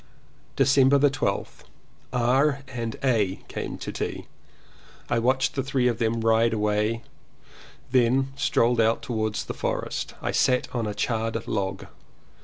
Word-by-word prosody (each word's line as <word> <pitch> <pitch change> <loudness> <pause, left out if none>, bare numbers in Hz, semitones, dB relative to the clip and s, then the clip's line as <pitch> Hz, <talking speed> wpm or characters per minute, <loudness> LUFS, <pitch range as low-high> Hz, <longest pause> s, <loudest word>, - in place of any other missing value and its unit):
December 135 0 +5
12th. 145 - -2 0.5
R. 135 +4 +2
and 115 -3 -4
A. 110 -8 +2
came - - -5
to - - -5
tea. - - -4 0.9
I 120 - +3
watched 130 +3 +1
the 135 - -1
three 135 -1 +1
of 120 -2 0
them 115 0 0
ride 115 +1 +3
away, 105 +2 0 0.9
then 130 +2 +2
strolled 120 -4 +2
out 115 +1 +2
towards 110 -3 -2
the - - -5
forest. - - -3
I - - -2
sat 125 -1 +2
on 115 -3 -1
a 105 - -4
charred 115 -1 -2
log. 95 -1 -2
115 Hz, 135 wpm, -25 LUFS, 110-130 Hz, 0.9 s, December